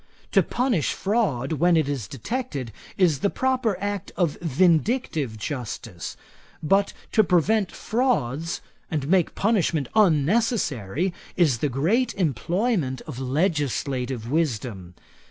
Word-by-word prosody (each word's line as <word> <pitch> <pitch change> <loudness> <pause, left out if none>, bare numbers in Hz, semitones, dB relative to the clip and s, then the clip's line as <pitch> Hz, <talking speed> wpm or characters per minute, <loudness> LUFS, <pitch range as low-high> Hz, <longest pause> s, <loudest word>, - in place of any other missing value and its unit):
To - - +5
punish 240 - 0
fraud 190 - 0
when 170 +3 +3
it 155 -3 +2
is 135 -8 -3
detected, 140 - -4 0.3
is 170 -7 +3
the 200 - +2
proper 255 -5 0
act 205 0 -3
of 170 -6 +1
vindictive 165 - +1
justice; 115 - -5 0.5
but 195 +6 +3 0.2
to 215 - +5
prevent 195 +2 +2
frauds, 170 - -1 0.3
and 150 -5 -2
make 180 0 +2
punishment 170 - +1
unnecessary, 180 - +2 0.2
is 150 -10 +3
the 150 - 0
great 175 - +1
employment 170 - 0
of 140 -6 -8
legislative 135 - -1
wisdom. 110 - -2
160 Hz, 115 wpm, -24 LUFS, 130-200 Hz, 0.5 s, To